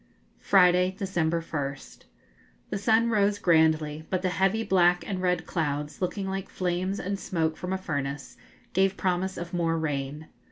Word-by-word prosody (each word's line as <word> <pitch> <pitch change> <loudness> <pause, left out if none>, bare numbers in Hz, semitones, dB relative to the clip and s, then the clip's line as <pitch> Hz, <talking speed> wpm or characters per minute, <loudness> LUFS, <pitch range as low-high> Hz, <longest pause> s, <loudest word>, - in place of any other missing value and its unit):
Friday, 180 -1 +4
December 170 -4 -1
1st. 140 -4 -6 0.7
The 200 - -1
sun 225 +2 +3
rose 205 -1 +2
grandly, 160 -4 +2
but 185 0 -1
the 185 - +2
heavy 195 +6 +1
black 180 -3 +3
and 190 -2 -3
red 180 -2 0
clouds, 150 -2 -3
looking 190 +2 -2
like 195 0 -4
flames 185 +2 -2
and 195 +1 -3
smoke 160 -5 -1
from 180 +2 -5
a 190 - 0
furnace, 140 -6 -4 0.4
gave 190 +1 +2
promise 185 0 -1
of 170 +1 -6
more 165 -2 +1
rain. 150 -1 -3
180 Hz, 155 wpm, -27 LUFS, 160-190 Hz, 0.7 s, Friday